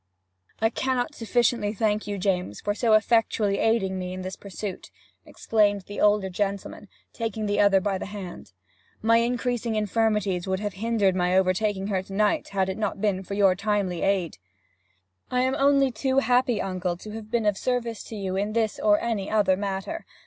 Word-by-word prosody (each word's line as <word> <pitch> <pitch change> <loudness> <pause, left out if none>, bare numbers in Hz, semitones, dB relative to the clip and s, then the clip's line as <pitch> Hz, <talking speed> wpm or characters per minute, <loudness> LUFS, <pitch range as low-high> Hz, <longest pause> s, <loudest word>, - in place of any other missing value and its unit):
'I 225 0 +3
cannot 260 +3 -1
sufficiently 230 -3 0
thank 210 0 0
you, 205 -1 -3
James, 180 - -1
for 205 - -1
so 225 +1 +2
effectually 215 -2 +2
aiding 195 -4 +1
me 180 0 -4
in 185 0 -6
this 185 +1 -5
pursuit!' 200 -1 -7 0.4
exclaimed 205 -2 +1
the 205 +2 -7
old 210 -1 +4
gentleman, 200 +1 -3 0.3
taking 225 -1 -3
the 205 0 0
other 200 -1 +5
by 195 0 -1
the - - -5
hand. 195 - -8 0.5
'My 230 +1 +5
increasing 240 -1 0
infirmities 210 -3 0
would 190 0 0
have 205 -1 -3
hindered 205 -1 +1
my 180 0 +2
overtaking 190 +1 +1
her 190 -2 0
to 190 +1 -11
night, 210 +1 +1
had 195 -1 0
it 190 +2 -4
not 210 - -2
been 195 -2 0
for 200 +1 -6
your 195 -2 +5
timely 195 -3 -1
aid.' 190 - 0 0.9
'I 250 0 +1
am 260 +1 +1
only 275 -1 +4
too 265 +2 -1
happy, 250 -3 +3
uncle, 185 -2 -2
to 210 +4 -10
have 215 0 -8
been 230 -1 0
of 210 -1 +3
service 235 -1 -2
to 225 - -8
you 190 -2 -3
in 205 +2 -1
this 220 -2 0
or 210 -1 +4
any 220 -4 -2
other 205 -3 +3
matter. 200 - -4
205 Hz, 185 wpm, -25 LUFS, 190-225 Hz, 0.9 s, other